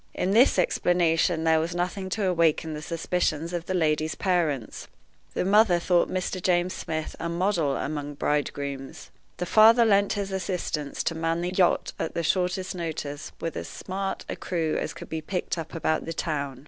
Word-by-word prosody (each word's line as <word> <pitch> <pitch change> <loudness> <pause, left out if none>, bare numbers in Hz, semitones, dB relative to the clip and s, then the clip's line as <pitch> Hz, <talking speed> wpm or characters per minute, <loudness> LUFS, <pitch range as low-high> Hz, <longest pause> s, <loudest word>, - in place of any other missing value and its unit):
In 185 - 0
this 230 +3 +5
explanation 175 -2 +2
there 160 -1 +4
was 165 +2 -2
nothing 180 +2 -2
to 205 +1 -1
awaken 165 -3 +2
the 150 - -5
suspicions 165 0 -1
of 175 -1 -3
the 185 - -1
lady's 155 -2 +1
parents. 165 - -1 0.5
The - - 0
mother 205 -2 +5
thought 175 0 +2
Mr. 185 0 -2
James 180 0 +2
Smith 155 -1 -4
a 170 - -3
model 170 -5 +1
among 145 -1 -4
bridegrooms. 140 0 -3 0.3
The 180 - -2
father 225 +5 +6
lent 200 -2 +3
his 200 -1 -3
assistance 180 -6 -3
to - - 0
man 165 +1 -1
the 175 +1 -2
yacht 185 -2 +2
at - - -3
the 170 - -1
shortest 185 +2 0
notice 155 -4 -5
with 165 - -4
as - - -5
smart 195 +1 -4
a - - -4
crew 165 -3 -2
as - - -3
could - - -9
be 160 0 -4
picked 180 +3 -2
up 160 0 -7
about 160 -1 0
the 165 - -4
town. 140 -5 -3
170 Hz, 180 wpm, -26 LUFS, 155-185 Hz, 0.5 s, father